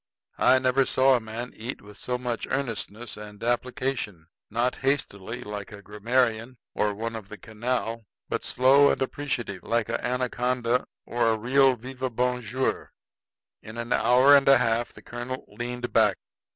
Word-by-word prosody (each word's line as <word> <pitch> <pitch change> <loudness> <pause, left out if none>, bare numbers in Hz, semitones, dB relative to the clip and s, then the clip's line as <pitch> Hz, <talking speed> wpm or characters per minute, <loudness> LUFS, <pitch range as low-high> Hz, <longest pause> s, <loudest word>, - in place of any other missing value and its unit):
I 130 - +6
never 130 +1 +3
saw 130 0 +5
a - - +2
man 115 +2 -6
eat 115 +4 -5
with 105 0 -13
so 125 +4 -3
much 125 -2 -3
earnestness 115 -4 -3
and 105 0 -10
application 120 - -2 0.2
not 120 +3 0
hastily, 120 -5 -2
like 105 0 -6
a 100 -1 -10
grammarian, 115 +3 0 0.2
or 105 -1 0
one 115 +2 -4
of 105 -3 -8
the 105 - -8
canal, 115 0 -3 0.2
but - - -2
slow 135 +3 +5
and - - +1
appreciative, 125 -8 -3
like 115 +2 0
a 115 - -2
anaconda, 125 -1 0 0.2
or 120 -1 +1
a 110 - +2
real 130 +3 +4
vive 130 +1 -6
bonjour. 125 0 -1 0.7
In 110 +2 -10
an 115 +1 -2
hour 130 +4 +6
and 140 -1 +5
a 135 - +8
half 115 -1 +1
the - - -15
colonel 120 +2 -6
leaned 120 0 -5
back. - - +4
120 Hz, 160 wpm, -26 LUFS, 110-130 Hz, 0.7 s, a